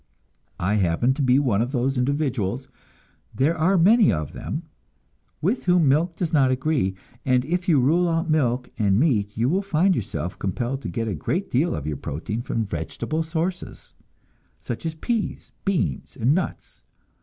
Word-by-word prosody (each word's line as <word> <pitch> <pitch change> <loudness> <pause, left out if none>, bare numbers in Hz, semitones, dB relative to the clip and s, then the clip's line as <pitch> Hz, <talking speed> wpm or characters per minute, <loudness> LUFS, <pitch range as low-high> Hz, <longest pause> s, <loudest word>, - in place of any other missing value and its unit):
I 100 +4 +1
happen 100 +7 +2
to 145 - -3
be 130 -1 +4
one 120 -8 +2
of 120 +2 -1
those 130 +1 +1
individuals 130 -3 -1 0.7
there 145 +6 +2
are 180 +4 +3
many 205 +5 +6
of 75 -3 -3
them - - -5 0.8
with 210 +10 0
whom 180 -4 +4
milk 165 +5 +2
does 170 -2 -3
not 135 -4 +4
agree; 130 -7 0 0.3
and 125 -1 +2
if 175 +4 -1
you 155 -5 +5
rule 170 +7 +3
out 165 +1 0
milk 130 -6 +1
and 100 -1 +3
meat, 105 -9 +1
you 135 - +2
find 185 -1 +2
yourself 85 - -4
compelled 120 +8 -2
to - - -5
get 115 -2 -2
a 105 - -1
great 175 - -2
deal 145 +8 +1
of 75 - -5
your 75 -2 -2
protein 85 +10 -4
from 115 -2 -2
vegetable 100 - -3
sources, 165 +3 -4 0.7
such 120 +7 -5
as 160 - -4
peas, 225 +6 -3
beans 155 - -1
and 125 +6 +3
nuts. 180 +1 -4
135 Hz, 165 wpm, -24 LUFS, 115-165 Hz, 0.8 s, many